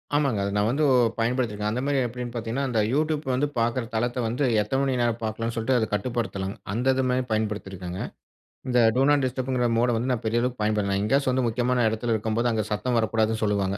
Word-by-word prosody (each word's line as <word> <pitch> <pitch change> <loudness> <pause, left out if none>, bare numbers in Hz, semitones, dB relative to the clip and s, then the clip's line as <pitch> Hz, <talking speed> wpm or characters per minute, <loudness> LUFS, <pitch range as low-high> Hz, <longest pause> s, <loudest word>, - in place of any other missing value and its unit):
ஆமாங்க. 140 -8 +1
அத 100 - -1
நா - - +3
வந்து 145 +5 +1 0.3
பயன்படுத்திருக்கே. 115 -3 0
அந்த 125 +3 -2
மாரி 140 0 +1
எப்படினு 120 +1 -6
பார்த்தீங்கனா, 120 +3 -3
அந்த 115 -3 0
Youtube 155 +1 0
வந்து 135 +4 +1
பாக்கிற 115 +2 0
தளத்த 120 +3 -1
வந்து 120 +5 -1 0.2
எத்தன 120 +6 -1
மணி 135 -2 0
நேர 120 0 +3
பாக்கலானு 115 +1 -3
சொல்ட்டு, 115 +3 +1
அத 110 - +1
கட்டுப்படுத்தலாங்க. 105 -3 -2 0.2
அந்த 125 +4 +2
இது 130 - +1
மரி 125 +1 +1
பயன்படுத்தி 105 -2 -1
இருக்கேங்க. 90 -1 -6 0.7
இந்த 125 -1 +2 0.2
டோ 130 - +3
நாட் 145 -2 +3
டிஸ்டப்ங்கிற 130 -1 -1
மோட 120 +2 +3
வந்து 120 +3 -1
நா 125 - +1
பெரிய 115 +2 +1
அளவுக்கு 125 -1 -2
பயன்படுத்தல. 105 -2 +1
எங்கேயாச்சு 135 +6 +2
வந்து 130 0 +1
முக்கியமான 125 +2 +1
எடத்தில 115 +2 -1
இருக்கும்போது, 110 +2 0
அங்க 110 -1 0
சத்தம் 120 +3 0
வரக்கூடாதுனு 110 0 0
சொல்வாங்க. 100 -2 0
120 Hz, 200 wpm, -25 LUFS, 110-125 Hz, 0.7 s, நா